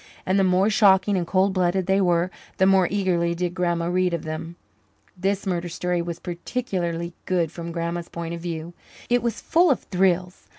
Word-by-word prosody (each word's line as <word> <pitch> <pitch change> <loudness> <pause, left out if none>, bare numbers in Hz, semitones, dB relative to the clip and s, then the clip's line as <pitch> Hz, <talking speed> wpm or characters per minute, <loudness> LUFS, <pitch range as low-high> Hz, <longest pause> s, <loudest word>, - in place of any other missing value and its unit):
And 190 +1 +2
the - - +4
more 185 +1 +3
shocking 205 -2 +4
and 175 -2 -1
cold 190 +1 +2
blooded 185 0 +1
they 190 +1 +2
were, 175 0 +2 0.3
the 190 - +4
more 190 -2 +4
eagerly 175 -4 0
did 175 0 -2
Grandma 175 -2 0
read 180 0 +1
of 165 - -6
them. 160 +2 -5 0.6
This 195 +2 -1
murder 175 -2 -2
story 175 +1 -1
was 170 -1 -4
particularly 175 -3 -3
good 170 -4 +1
from 170 -1 -6
Grandma's 170 0 -3
point 170 0 -5
of 170 - -6
view; 170 0 -5 0.4
it 245 0 +4
was 235 -1 -2
full 345 +1 +3
of 270 - +2
"thrills." 180 -1 0
180 Hz, 185 wpm, -24 LUFS, 170-190 Hz, 0.6 s, the